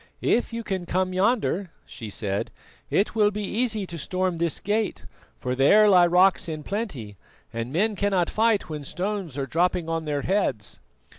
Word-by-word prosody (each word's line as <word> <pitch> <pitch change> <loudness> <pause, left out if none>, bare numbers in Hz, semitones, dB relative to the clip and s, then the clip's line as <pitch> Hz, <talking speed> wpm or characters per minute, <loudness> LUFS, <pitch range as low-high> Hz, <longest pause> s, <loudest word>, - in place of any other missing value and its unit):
"If 245 - +2
you 230 0 -4
can 190 -4 -3
come 185 +1 0
yonder," 200 -2 +1 0.2
she 110 -3 -8
said, 100 0 -3 0.4
"it 200 - +1
will 210 -2 +4
be 210 0 -4
easy 220 0 -1
to 170 -2 -7
storm 185 +2 -1
this 170 -2 0
gate, 210 +1 -1 0.3
for 125 - -2
there 175 +12 +5
lie 180 -3 +6
rocks 180 0 +3
in 155 -1 -5
plenty, 145 - -5 0.4
and 115 +2 -4
men 205 +7 +1
cannot 195 -3 +1
fight 220 -3 +1
when 150 -3 -6
stones 185 -2 -3
are 135 - -1
dropping 170 +2 0
on 165 -1 -2
their 145 -2 -2
heads." 120 - -1
185 Hz, 170 wpm, -25 LUFS, 150-205 Hz, 0.4 s, lie